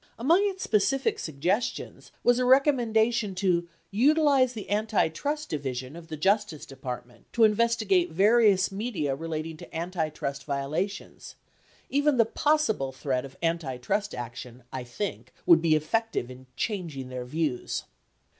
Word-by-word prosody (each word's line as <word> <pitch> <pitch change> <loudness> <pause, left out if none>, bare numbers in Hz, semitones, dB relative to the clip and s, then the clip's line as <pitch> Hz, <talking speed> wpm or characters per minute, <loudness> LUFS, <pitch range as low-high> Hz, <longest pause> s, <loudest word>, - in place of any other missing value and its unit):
Among 320 +11 +4
its 380 -1 -6
specific 270 - +1
suggestions 170 - -2
was 245 0 +4
a - - +2
recommendation 240 -6 +3
to 175 -2 +1 0.2
"utilize 275 +2 +4
the 210 -4 -7
antitrust 220 - 0
division 135 -2 -4
(of 170 -1 -10
the 155 - -6
Justice 195 -1 +1
Department) 125 -3 -8
to 235 - +3
investigate 215 -5 +3
various 200 +2 +4
media 195 - -2
relating 160 +1 -5
to - - -12
antitrust 155 -5 -3
violations. 150 +8 -4 0.5
Even 285 0 +2
the 230 - +5
possible 225 - +1
threat 130 -1 -2
of 135 - -12
antitrust 165 +4 -1
action 120 +1 -8
I 130 -1 -4
think 195 +12 -5
would 165 -2 +7
be 160 -2 +3
effective 155 - -1
in 130 +1 -13
changing 160 - -3
their 125 -1 -5
views." 145 -2 -2
180 Hz, 130 wpm, -27 LUFS, 140-230 Hz, 0.5 s, would